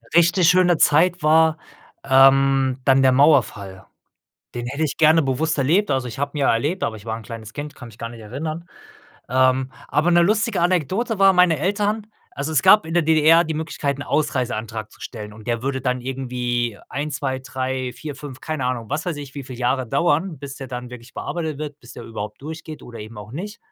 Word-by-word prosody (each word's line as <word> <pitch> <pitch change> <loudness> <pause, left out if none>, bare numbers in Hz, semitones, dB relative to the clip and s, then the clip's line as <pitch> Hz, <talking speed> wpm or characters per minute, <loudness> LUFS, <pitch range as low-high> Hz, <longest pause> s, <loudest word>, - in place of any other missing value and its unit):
Richtig 170 +1 +5
schöne 180 -2 +4
Zeit 175 +5 +3
war, 160 +1 +4 0.5
ähm, 135 -1 +4
dann 135 -1 +5
der 130 -1 +5
Mauerfall. 120 -9 +2 0.7
Den 120 0 -4
hätte 140 +5 -2
ich 150 - -3
gerne 160 0 +5
bewusst 140 +4 0
erlebt, 170 +10 +2
also 130 -2 0
ich 115 - -9
habe 145 +2 -3
ihn - - -2
ja 135 - +3
erlebt, 145 +11 -1
aber 110 - -1
ich 105 - -13
war 110 -1 -3
'n 115 - -9
kleines 110 -1 -9
Kind, 145 0 -7
kann 125 - -11
mich 110 0 -16
gar 115 - -5
nicht 115 -1 -11
erinnern. 155 +10 -5 0.6
Ähm, 130 +1 +2 0.2
aber 155 +5 +2
'ne 175 0 +5
lustige 210 +1 +1
Anekdote 185 - 0
war 195 0 +6
meine 180 -4 +4
Eltern 205 +5 -1 0.3
also 145 +3 -2
es 150 - +3
gab 210 +8 +6
in 160 - -6
der 175 0 +3
DDR 160 +2 +5
die 160 - -3
Möglichkeit, 150 -3 -2
'n - - -4
Ausreiseantrag 115 -8 -2
zu - - -20
stellen 105 -3 -8
und 105 0 -14
der 120 -1 -1
würde 135 0 -2
dann 125 0 -1
irgendwie 125 -3 -2
1, 145 +1 -3
2, 135 -2 -2
3, 130 -1 -3
4, 150 -2 -7
5, 140 -2 -10
keine 155 -5 -2
Ahnung, 120 -3 -3
was 150 +5 -2
weiß 175 -4 -2
ich, 140 -2 -9
wie 140 - -5
viel 130 -1 -9
Jahre 125 +1 0
dauern, 170 +4 0
bis 140 -2 -8
der 135 - -7
dann 125 0 -6
wirklich 125 0 -12
bearbeitet 160 -4 -4
wird, 150 -1 -6
bis 120 - -13
der - - -9
überhaupt 105 0 -7
durchgeht 155 +1 -8
oder 120 -1 -10
eben 110 +2 -9
auch 105 +1 -10
nicht. 205 - -6
140 Hz, 210 wpm, -22 LUFS, 125-160 Hz, 0.7 s, war